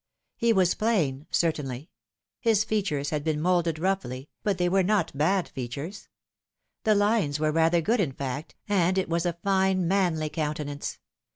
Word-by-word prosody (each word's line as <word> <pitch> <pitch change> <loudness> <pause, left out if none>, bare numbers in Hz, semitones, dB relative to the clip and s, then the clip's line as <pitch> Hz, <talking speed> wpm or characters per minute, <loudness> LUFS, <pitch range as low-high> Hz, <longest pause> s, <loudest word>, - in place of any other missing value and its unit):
He 235 0 +2
was 185 -5 +3
plain, 160 - 0
certainly. 150 -3 -1 0.5
His 220 -2 +3
features 175 -11 -1
had 150 -2 -1
been 155 -1 0
moulded 170 -1 +1
roughly, 155 -7 -2
but 200 -3 0
they 180 0 +1
were 190 +2 +3
not 190 -5 +1
bad 175 +6 +2
features. 140 - -6 0.8
The 215 -1 +4
lines 205 -8 +2
were 155 0 +1
rather 165 +2 +3
good, 225 +8 +1
in 160 -9 0
fact, 140 +3 -5
and 190 -2 +2
it 190 - 0
was 170 +1 0
a 170 -1 -2
fine 190 -2 +2
manly 170 -5 +1
countenance. 150 -2 -3
170 Hz, 160 wpm, -27 LUFS, 150-195 Hz, 0.8 s, The